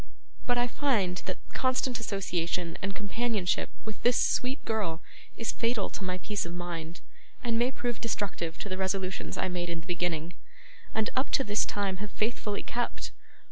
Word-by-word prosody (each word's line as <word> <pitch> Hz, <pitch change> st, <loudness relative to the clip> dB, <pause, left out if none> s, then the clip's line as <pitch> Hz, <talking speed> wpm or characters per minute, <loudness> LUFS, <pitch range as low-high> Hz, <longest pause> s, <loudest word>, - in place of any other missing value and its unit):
But 245 Hz, -1 st, +4 dB
I 245 Hz, -, +4 dB
find 225 Hz, -9 st, +2 dB
that -, -, -1 dB, 0.2 s
constant 255 Hz, -1 st, +2 dB
association 180 Hz, -5 st, 0 dB
and 195 Hz, 0 st, -1 dB
companionship 205 Hz, -2 st, +1 dB, 0.2 s
with 220 Hz, -1 st, -5 dB
this 245 Hz, 0 st, +5 dB
sweet 260 Hz, +3 st, +2 dB
girl 205 Hz, -7 st, 0 dB, 0.3 s
is 230 Hz, -, 0 dB
fatal 230 Hz, -3 st, +1 dB
to -, -, -4 dB
my 185 Hz, 0 st, 0 dB
peace 205 Hz, +2 st, -1 dB
of 170 Hz, 0 st, -4 dB
mind, 170 Hz, -1 st, -4 dB, 0.4 s
and 230 Hz, -2 st, +2 dB
may 245 Hz, +1 st, +4 dB
prove 240 Hz, -3 st, -2 dB
destructive 190 Hz, -7 st, -1 dB
to -, -, -3 dB
the 185 Hz, -1 st, -2 dB
resolutions 190 Hz, -1 st, 0 dB
I -, -, +2 dB
made 175 Hz, -1 st, -1 dB
in 170 Hz, -1 st, -2 dB
the -, -, -16 dB
beginning, 175 Hz, -2 st, 0 dB, 0.6 s
and 220 Hz, 0 st, +2 dB
up 260 Hz, +1 st, +2 dB
to 270 Hz, -, +5 dB
this 210 Hz, -2 st, +3 dB
time 200 Hz, -2 st, 0 dB
have 205 Hz, +2 st, -4 dB
faithfully 210 Hz, -1 st, 0 dB
kept. 240 Hz, 0 st, -1 dB
200 Hz, 175 wpm, -31 LUFS, 180-230 Hz, 0.6 s, this